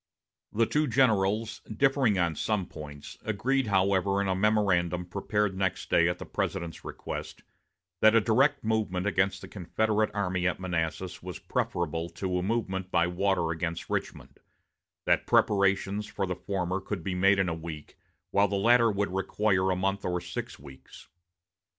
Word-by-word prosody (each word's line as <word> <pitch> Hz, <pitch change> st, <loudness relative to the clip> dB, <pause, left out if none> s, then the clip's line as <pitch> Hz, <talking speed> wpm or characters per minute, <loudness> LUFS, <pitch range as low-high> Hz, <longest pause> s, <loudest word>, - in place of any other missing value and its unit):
The 115 Hz, +2 st, +2 dB
two 150 Hz, +5 st, +1 dB
generals, 110 Hz, -4 st, +2 dB
differing 135 Hz, -2 st, +2 dB
on 85 Hz, -3 st, +1 dB
some 105 Hz, +3 st, 0 dB
other 90 Hz, -, -9 dB
points, 75 Hz, -1 st, -9 dB
agreed, 125 Hz, +5 st, 0 dB
however, 100 Hz, 0 st, +2 dB
in 100 Hz, -, 0 dB
a 95 Hz, -, +2 dB
memorandum 95 Hz, -4 st, +1 dB
prepared 100 Hz, +2 st, -1 dB
next 95 Hz, -1 st, -2 dB
day 85 Hz, 0 st, +4 dB
at 90 Hz, -, -2 dB
the -, -, -8 dB
President's 85 Hz, -4 st, -3 dB
request, -, -, -7 dB, 0.6 s
that 110 Hz, +1 st, +6 dB
a -, -, +8 dB
direct 135 Hz, +6 st, +2 dB
movement 110 Hz, -4 st, 0 dB
against 95 Hz, -1 st, +1 dB
the 95 Hz, -, -9 dB
Confederate 110 Hz, +3 st, 0 dB
army 95 Hz, -3 st, 0 dB
at 90 Hz, -, -1 dB
Manassas 90 Hz, 0 st, -3 dB
was 90 Hz, -2 st, -7 dB
preferable 85 Hz, 0 st, -2 dB
to 90 Hz, +1 st, -2 dB
a -, -, -2 dB
movement 95 Hz, -3 st, -2 dB
by 85 Hz, -, +3 dB
water 90 Hz, -1 st, 0 dB
against 85 Hz, 0 st, -4 dB
Richmond; -, -, -4 dB, 0.7 s
that -, -, +2 dB
preparations 100 Hz, +1 st, +2 dB
for 100 Hz, -, -2 dB
the 90 Hz, -1 st, -3 dB
former 95 Hz, -1 st, -2 dB
could 95 Hz, -3 st, -5 dB
be 95 Hz, -, -2 dB
made 95 Hz, +2 st, +4 dB
in 95 Hz, -1 st, +2 dB
a 85 Hz, -, -1 dB
week, 80 Hz, -2 st, -8 dB, 0.4 s
while 100 Hz, +1 st, +4 dB
the 100 Hz, -, -2 dB
latter 115 Hz, +3 st, +5 dB
would 100 Hz, -2 st, -1 dB
require 95 Hz, 0 st, +1 dB
a 95 Hz, -, +2 dB
month 95 Hz, +2 st, -1 dB
or 90 Hz, 0 st, -1 dB
six -, -, -6 dB
weeks. 70 Hz, -1 st, -14 dB
95 Hz, 165 wpm, -28 LUFS, 90-105 Hz, 0.7 s, a